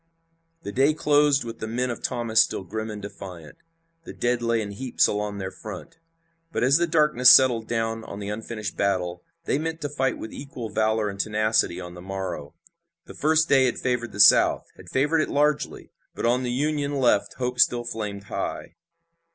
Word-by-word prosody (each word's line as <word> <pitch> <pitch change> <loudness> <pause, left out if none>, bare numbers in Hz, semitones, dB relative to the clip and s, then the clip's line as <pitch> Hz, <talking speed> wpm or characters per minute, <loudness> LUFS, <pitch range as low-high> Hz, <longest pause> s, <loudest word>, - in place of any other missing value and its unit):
The - - -5
day 135 +7 +2
closed 145 -2 +3
with 115 -1 -8
the 110 - -4
men 125 +2 -1
of 120 - -7
Thomas 120 -3 +2
still - - -1
grim 110 +4 -5
and 105 -1 -7
defiant. 90 -6 -10 0.5
The - - -9
dead 120 0 -1
lay 115 -1 +1
in 105 -2 -4
heaps 125 +4 +1
along 105 0 -2
their 95 -1 -5
front, 100 - -10 0.5
but - - -1
as 135 +4 +5
the 175 0 +1
darkness 150 -6 +4
settled 120 -5 +6
down 115 -1 -2
on 100 - -8
the 100 0 -5
unfinished 110 0 -5
battle 90 -3 -1 0.2
they 140 - 0
meant 160 +1 -3
to 145 - -3
fight 135 -2 -1
with 110 - -8
equal 125 -5 -7
valor 110 0 +1
and 100 -1 -6
tenacity 110 -3 +1
on 90 -1 -8
the 90 - -10
morrow. 95 -6 -6 0.5
The - - -11
first 155 +1 +2
day 135 -2 +4
had 125 - -1
favored 125 -2 -2
the 105 - -9
South, - - +6
had - - -14
favored 145 +5 +1
it 155 - 0
largely, 150 +1 0 0.2
but - - -3
on 120 +2 +2
the 125 -1 -2
Union 145 +2 -1
left 125 -6 +2
hope 125 -1 -3
still 120 0 +3
flamed 105 -4 -5
high. 100 - -5
115 Hz, 190 wpm, -24 LUFS, 105-135 Hz, 0.5 s, settled